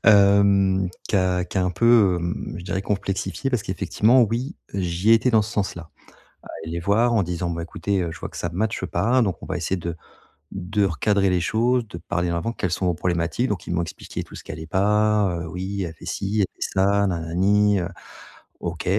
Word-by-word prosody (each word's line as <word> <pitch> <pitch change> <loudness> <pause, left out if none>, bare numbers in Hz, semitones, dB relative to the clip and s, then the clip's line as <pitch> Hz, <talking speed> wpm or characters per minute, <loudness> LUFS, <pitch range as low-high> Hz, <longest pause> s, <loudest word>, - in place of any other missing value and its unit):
Hem, 100 -2 +5 0.2
qui - - +2
a 90 -1 +1
qui 90 - -3
a 90 - +2
un 90 - +1
peu, 110 -1 +4
hem, 85 -1 -4
je 90 - -9
dirais, 95 0 -2
complexifié 100 +5 -2
parce 125 -5 0
qu'effectivement, 110 +6 +3
oui, 120 - -1 0.2
j'y 90 +2 0
étais 115 +3 +4
dans 110 -2 +4
ce 105 - -6
sens-là. 85 -5 -3 0.5
À - - -13 0.2
aller 80 - -6
les 85 - -2
voir 110 +6 +2
en 110 - +3
disant: 85 0 -2
«Bah, 85 0 -3
écoutez, 95 +3 -2
heu, 85 - -2
je - - -10
vois - - -5
que - - -12
ça 85 - -2
match 110 +5 -1
pas, 125 +2 +2
donc 95 -6 -2
on - - -7
va 95 - -2
essayer 90 +2 -1
de 85 -1 -5 0.6
de 100 +2 0
recadrer 100 +3 +1
les 90 -1 +1
choses, 115 +5 +1
de 85 - -8
parler 85 +1 -2
en - - -1
avant, 115 +8 -2
quelles 90 -6 -2
sont 90 +2 -1
vos 90 - +2
problématiques?». 85 +7 -1
Donc 100 -4 -3
ils - - -2
m'ont 85 - +1
expliqué 85 - -6
tout - - -13
ce - - -9
qui - - -8
allait 80 0 -7
pas: 105 0 +2
«Heu, 85 - -5
oui, 95 +3 -4
elle 80 -2 -5
fait - - -13
ci, 105 +2 -1
elle 95 - +2
fait - - -3
ça, 100 +1 +3
na 90 -3 -1
na 80 0 -6
ni, 105 +2 +3
heu» 90 - -3 0.7
OK. 85 -1 -4
95 Hz, 230 wpm, -23 LUFS, 85-105 Hz, 0.7 s, Hem